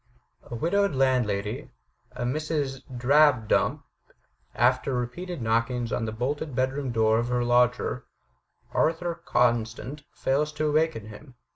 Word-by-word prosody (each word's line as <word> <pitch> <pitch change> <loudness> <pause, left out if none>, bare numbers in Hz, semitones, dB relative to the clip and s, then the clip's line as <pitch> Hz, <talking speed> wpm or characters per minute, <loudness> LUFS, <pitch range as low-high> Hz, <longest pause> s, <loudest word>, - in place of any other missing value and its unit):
A 120 - -8
widowed 195 - +1
landlady, 115 -6 0 0.4
a - - -5
Mrs. 140 0 -2
Drabdump, 130 -1 +3 0.7
after 130 +2 +2
repeated 140 +5 -4
knockings 115 +1 0
on 115 - -1
the 110 - -3
bolted 135 +5 -3
bedroom 130 +1 -1
door 110 -1 +3
of 120 - -1
her 125 0 0
lodger, 120 0 +2 0.7
Arthur 170 +2 +1
Constant, 120 +4 0
fails 150 +3 0
to 155 0 -2
awaken 150 -7 0
him. 125 +5 -13
125 Hz, 120 wpm, -26 LUFS, 120-150 Hz, 0.7 s, Drabdump